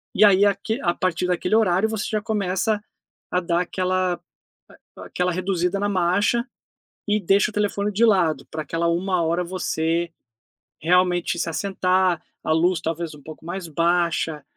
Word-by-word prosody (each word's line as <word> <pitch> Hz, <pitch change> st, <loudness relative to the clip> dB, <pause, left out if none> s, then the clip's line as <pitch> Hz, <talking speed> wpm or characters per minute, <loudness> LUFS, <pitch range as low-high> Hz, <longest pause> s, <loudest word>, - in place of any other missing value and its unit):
E -, -, +5 dB
aí 200 Hz, -1 st, +6 dB
aque 210 Hz, +4 st, 0 dB
a 175 Hz, -1 st, +1 dB
partir 185 Hz, -1 st, -1 dB
daquele 180 Hz, +3 st, 0 dB
horário, 210 Hz, -1 st, +3 dB
você 220 Hz, -2 st, -3 dB
já 215 Hz, -1 st, -1 dB
começa 210 Hz, 0 st, -1 dB, 0.5 s
a 180 Hz, -, +2 dB
dar 170 Hz, -1 st, 0 dB
aquela 185 Hz, 0 st, 0 dB, 0.8 s
a -, -, -10 dB
aquela 180 Hz, 0 st, -1 dB
reduzida 185 Hz, +1 st, -1 dB
na 205 Hz, -, 0 dB
marcha 200 Hz, +6 st, +1 dB, 0.6 s
e 210 Hz, +1 st, +1 dB
deixa 195 Hz, +3 st, +3 dB
o -, -, -18 dB
telefone 205 Hz, 0 st, 0 dB
de 225 Hz, +4 st, +2 dB
lado, 185 Hz, -8 st, +3 dB
pra 155 Hz, -1 st, -4 dB
aquela 165 Hz, +3 st, -1 dB
1 180 Hz, +1 st, 0 dB
hora 170 Hz, +2 st, 0 dB
você 170 Hz, -2 st, -1 dB, 0.7 s
realmente 175 Hz, +1 st, +2 dB
se 170 Hz, -, -1 dB
assentar, 185 Hz, -1 st, +1 dB, 0.2 s
a 155 Hz, -, 0 dB
luz 165 Hz, +1 st, +2 dB
talvez 165 Hz, 0 st, -3 dB
um 145 Hz, -, -14 dB
pouco 155 Hz, 0 st, -11 dB
mais 175 Hz, 0 st, -5 dB
baixa, 170 Hz, -1 st, 0 dB
180 Hz, 160 wpm, -23 LUFS, 170-200 Hz, 0.8 s, aí